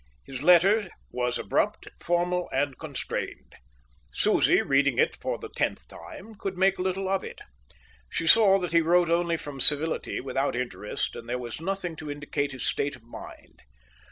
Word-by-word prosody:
His 130 -1 -7
letter 185 +5 +5 0.2
was 125 -1 -1
abrupt, - - -1
formal, 175 +1 0
and 135 0 0
constrained. 150 -5 -5 0.6
Susie, - - +3
reading 140 -2 +2
it - - +3
for - - -3
the - - -9
tenth - - -2
time, 220 +4 -11
could 195 -3 -5
make 190 +1 +3
little 190 +1 -1
of 195 0 0
it. - - -8 0.7
She 165 - -2
saw 195 +2 +7
that 180 -3 -3
he 170 0 +5
wrote 170 +1 +3
only 170 0 +2
from 145 -3 -8
civility, 150 +4 +2
without 135 0 -1
interest; 120 -4 -3
and 115 - -9
there 125 - -1
was 120 +3 -6
nothing 185 -2 -3
to 155 - -7
indicate 145 0 -3
his 130 -2 -5
state 145 0 -1
of 125 - -18
mind. 115 - -12
160 Hz, 165 wpm, -27 LUFS, 135-180 Hz, 0.7 s, saw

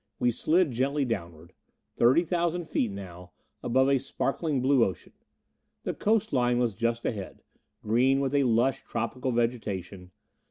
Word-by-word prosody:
We 120 - +2
slid 160 +6 +2
gently 135 +4 0
downward. 85 -7 -5 0.4
Thirty 130 +8 +4
thousand 175 0 -1
feet 120 - 0
now, 90 -3 -9 0.3
above 130 +2 +2
a 135 -1 +3
sparkling 140 +2 -2
blue 130 -1 +3
ocean. 95 - -4 0.7
The - - -2
coastline 145 - +1
was 120 -3 +1
just 115 +3 -2
ahead: 100 -5 -5 0.4
green 125 +5 +3
with 135 0 -1
a 140 -1 +3
lush, 120 +2 +2
tropical 125 +3 -3
vegetation. 100 -6 -3
125 Hz, 135 wpm, -27 LUFS, 110-140 Hz, 0.7 s, Thirty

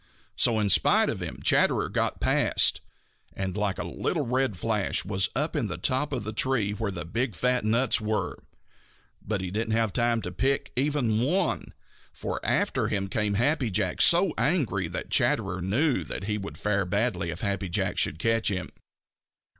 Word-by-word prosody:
So 115 -2 +3
in 105 -1 +1
spite - - +4
of - - -6
him - - -5
Chatterer - - +3
got - - -1
past, - - +2 0.5
and 95 -1 -3
like 105 -2 -1
a - - -3
little - - -2
red 125 -4 0
flash 105 0 -1
was 95 -1 +1
up 150 +6 -1
in 135 -7 0
the 90 - -4
top 140 +3 0
of 130 -5 -2
the 110 +1 -5
tree 115 -3 0
where 105 0 -3
the 85 -4 -5
big, 115 +5 -2
fat 125 +2 +1
nuts 115 +2 +2
were. 110 0 -1 0.9
But 100 -2 -3
he 95 -1 -4
didn't 110 +2 -1
have 115 -2 +1
time 120 -2 +1
to 90 - -4
pick 130 +9 -1
even 130 -5 +1
one, 175 +7 -1 0.4
for - - -5
after - - +1
him 100 -2 -2
came 105 0 0
Happy 130 +2 +1
Jack 95 -2 0
so 175 0 +5
angry 125 - +1
that 85 - -6
Chatterer 95 -1 +1
knew 125 - +1
that - - -5
he 105 +1 -2
would 100 - -7
fare 100 -1 0
badly 100 -2 0
if 85 +1 -6
Happy 100 -2 -2
Jack - - -1
should - - +1
catch 115 +5 +1
him. 95 -3 -3
110 Hz, 180 wpm, -27 LUFS, 95-125 Hz, 0.9 s, so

